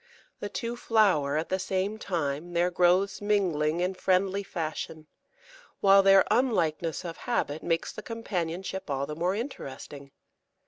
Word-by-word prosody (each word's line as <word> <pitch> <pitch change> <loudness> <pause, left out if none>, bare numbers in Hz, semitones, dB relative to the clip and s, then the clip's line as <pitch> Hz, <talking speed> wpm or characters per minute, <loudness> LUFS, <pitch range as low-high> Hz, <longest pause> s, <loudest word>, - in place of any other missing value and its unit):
The 205 - -4
two 235 +3 -4
flower 190 -12 +2
at 160 - -2
the 190 - 0
same 195 +3 -2
time, 165 -3 -3
their 175 +1 +2
growths 180 +3 +2
mingling 175 -6 +1
in 180 +1 0
friendly 190 +1 +1
fashion, 160 -4 -5 0.7
while 195 0 +6
their 195 0 +6
unlikeness 175 - +1
of 165 -1 -6
habit 155 -10 -2
makes 165 -1 -1
the - - -7
companionship 190 -5 -4
all 140 0 -1
the 150 - -6
more 175 +4 0
interesting. 140 - -7
180 Hz, 140 wpm, -28 LUFS, 160-200 Hz, 0.7 s, while